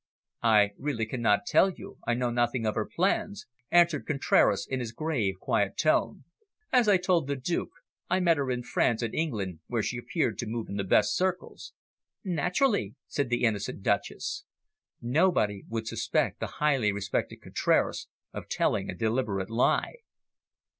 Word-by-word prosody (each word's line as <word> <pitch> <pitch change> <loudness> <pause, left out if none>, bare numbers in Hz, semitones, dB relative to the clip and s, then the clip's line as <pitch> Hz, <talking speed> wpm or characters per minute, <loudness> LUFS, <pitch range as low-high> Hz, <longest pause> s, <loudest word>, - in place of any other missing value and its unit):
"I 105 -3 +4
really 135 -6 -2
cannot 110 +1 +1
tell 190 - +4
you. 185 - -10
I 120 - +2
know 125 0 -1
nothing 120 0 0
of 110 - +1
her 110 - -2
plans," 200 +3 -1 0.2
answered 170 -4 +3
Contraras 140 -3 +2
in 130 - -2
his 115 -3 -5
grave, 130 -12 -1
quiet - - 0
tones. - - +1 0.5
"As 250 -3 +4
I 200 -2 +6
told 180 -5 +1
the 140 - -1
Duke, 140 +6 -2 0.4
I 185 - +2
met 170 -3 +3
her 140 -2 -1
in 125 -1 -2
France 120 -1 +1
and 115 - -3
England, 105 - -2
where 115 -3 -1
she 120 - -2
appeared 120 - -2
to 120 - -3
move 115 +1 -4
in 100 - -4
the 100 - -1
best 95 - +3
circles." 185 0 -3 0.5
"Naturally," 180 - 0
said 140 -4 -2
the 120 0 0
innocent 105 -3 -1
Duchess. 410 - -1 0.6
Nobody 120 - +1
would 110 0 -3
suspect - - -1
the - - -2
highly 135 -8 +2
respected 100 0 -3
Contraras - - 0 0.3
of - - -7
telling - - 0
a - - -4
deliberate 110 -3 -1
lie. 120 - +1
125 Hz, 160 wpm, -28 LUFS, 110-165 Hz, 0.6 s, I